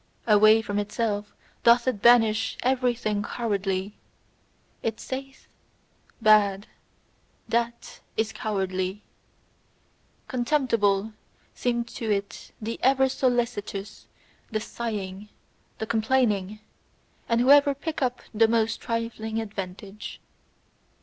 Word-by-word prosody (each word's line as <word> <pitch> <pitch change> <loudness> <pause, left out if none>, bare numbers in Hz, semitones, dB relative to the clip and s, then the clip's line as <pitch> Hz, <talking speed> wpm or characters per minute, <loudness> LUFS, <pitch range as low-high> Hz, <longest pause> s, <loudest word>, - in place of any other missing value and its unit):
Away 215 0 +6
from 205 -1 -2
itself 205 0 -2 0.3
doth 235 +1 +5
it 230 -6 0
banish 225 -2 +4
everything 245 -5 +1
cowardly; 200 -3 -2 0.8
it 225 -1 -2
saith: 270 +1 -7 0.7
"Bad 210 -3 +4 0.8
THAT 235 0 -2 0.2
IS 220 0 0
cowardly!" 190 -1 -2 1.2
Contemptible 230 -6 +1 0.4
seem 240 -1 -1
to 230 -1 -6
it 200 -1 -2
the 225 +1 -5
ever 265 0 +4
solicitous, 235 -6 -2 0.4
the 220 - -1
sighing, 210 -3 -5 0.5
the 220 - -3
complaining, 220 -3 +1 0.7
and 230 0 +3
whoever 280 +2 +6
pick 310 +3 -5
up 250 -2 -1
the 225 +1 +4
most 225 0 +1
trifling 230 -1 -3
advantage. 200 -1 -7
220 Hz, 95 wpm, -26 LUFS, 205-240 Hz, 1.2 s, Away